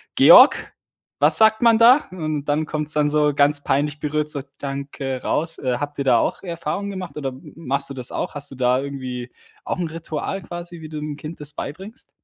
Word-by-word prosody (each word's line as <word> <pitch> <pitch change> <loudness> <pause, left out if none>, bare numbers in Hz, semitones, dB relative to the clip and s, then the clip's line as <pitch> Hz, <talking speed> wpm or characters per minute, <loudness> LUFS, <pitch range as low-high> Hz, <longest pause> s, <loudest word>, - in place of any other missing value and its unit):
„Georg, - - +7 0.5
was - - +7
sagt 220 0 +4
man 230 -1 +5
da?" 250 +5 +6
Und 155 -5 -4
dann 150 +2 0
kommt 150 -1 -3
es - - +3
dann 150 -1 +1
so 150 0 +2
ganz 145 +1 +2
peinlich 145 +2 -1
berührt, 150 0 -2
so: 145 -2 -2 0.2
„Danke" 135 -1 -5
raus. 165 +1 -1
Äh, 125 -2 -1
habt 145 0 -5
ihr 140 - -1
da 125 -3 +4
auch - - -2
Erfahrung 170 +3 -4
gemacht, 185 -5 -7
oder 135 -2 -3
m 130 0 -13
machst 140 -3 -1
du 140 - -6
das 125 -2 -3
auch? - - -4
Hast 145 0 -1
du 135 - -9
da 125 0 +1
irgendwie 130 -3 -6 0.3
auch - - -3
'n 175 - -1
Ritual 165 +3 -5
quasi, 175 0 -8
wie 155 - -9
du 155 - -7
'nem 150 -1 -5
Kind 155 +2 -9
das 150 0 -3
beibringst? 195 - -8
150 Hz, 215 wpm, -21 LUFS, 140-165 Hz, 0.5 s, Georg